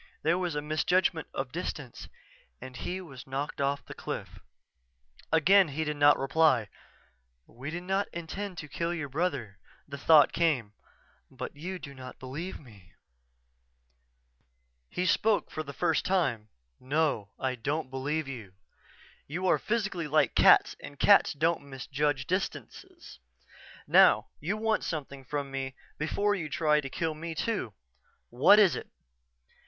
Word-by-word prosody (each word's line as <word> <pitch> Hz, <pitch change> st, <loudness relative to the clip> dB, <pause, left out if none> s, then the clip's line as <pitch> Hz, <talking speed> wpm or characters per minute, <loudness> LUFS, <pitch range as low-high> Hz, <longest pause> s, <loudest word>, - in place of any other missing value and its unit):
There 170 Hz, +3 st, +2 dB
was 175 Hz, -4 st, -2 dB
a 150 Hz, -, -2 dB
misjudgment 160 Hz, +2 st, +1 dB
of 135 Hz, -1 st, -4 dB
distance 150 Hz, -6 st, -6 dB, 0.5 s
and 130 Hz, 0 st, -10 dB
he 185 Hz, +9 st, -4 dB
was 135 Hz, -8 st, -11 dB
knocked 140 Hz, +2 st, -4 dB
off 140 Hz, +1 st, -1 dB
the -, -, -9 dB
cliff._" -, -, -6 dB, 0.9 s
Again 180 Hz, +4 st, +5 dB
he 155 Hz, +2 st, -3 dB
did 150 Hz, -1 st, -3 dB
not 145 Hz, 0 st, +6 dB
reply. 135 Hz, -5 st, +2 dB, 0.8 s
"We 130 Hz, +5 st, -8 dB
did 175 Hz, +2 st, -5 dB
not 195 Hz, +2 st, 0 dB
intend 180 Hz, +3 st, -6 dB
to 150 Hz, -, -6 dB
kill 170 Hz, +4 st, -2 dB
your 150 Hz, -4 st, -4 dB
brother," 130 Hz, -, -2 dB, 0.3 s
the 140 Hz, -1 st, -7 dB
thought 150 Hz, 0 st, +6 dB
came, 135 Hz, -11 st, +1 dB, 0.6 s
"but -, -, -7 dB
you 180 Hz, +6 st, -5 dB
do 140 Hz, -5 st, -10 dB
not 130 Hz, -1 st, -10 dB
believe 145 Hz, +8 st, -6 dB
me." 100 Hz, -, -17 dB, 2.0 s
He 180 Hz, -, -2 dB
spoke 210 Hz, +4 st, +2 dB
for 155 Hz, -, -4 dB
the 140 Hz, -, -7 dB
first 150 Hz, +4 st, 0 dB
time. 130 Hz, -, 0 dB, 0.3 s
"No, 140 Hz, -7 st, 0 dB
I 130 Hz, -1 st, -1 dB
don't 135 Hz, +3 st, -3 dB
believe 145 Hz, +3 st, -2 dB
you. 115 Hz, -9 st, -8 dB, 0.7 s
You 175 Hz, +6 st, -4 dB
are -, -, +3 dB
physically 210 Hz, -7 st, -2 dB
like 155 Hz, +1 st, +2 dB
cats -, -, +6 dB
and 145 Hz, -, -10 dB
cats 200 Hz, -, +6 dB
don't 165 Hz, +3 st, +1 dB
misjudge 135 Hz, +1 st, -2 dB
distances. 185 Hz, +2 st, -5 dB, 0.7 s
Now, -, -, +5 dB
you 195 Hz, +7 st, -2 dB
want 220 Hz, 0 st, 0 dB
something 140 Hz, -4 st, -5 dB
from 140 Hz, 0 st, -4 dB
me 135 Hz, -1 st, -4 dB, 0.2 s
before 200 Hz, +7 st, +1 dB
you 165 Hz, -6 st, -3 dB
try 150 Hz, -1 st, +2 dB
to 135 Hz, -, -6 dB
kill 160 Hz, +4 st, -2 dB
me, 165 Hz, +1 st, -6 dB
too. 160 Hz, -, -2 dB, 0.6 s
What 135 Hz, -, +6 dB
is 195 Hz, -9 st, +5 dB
it?" -, -, -7 dB
150 Hz, 145 wpm, -29 LUFS, 135-175 Hz, 2.0 s, not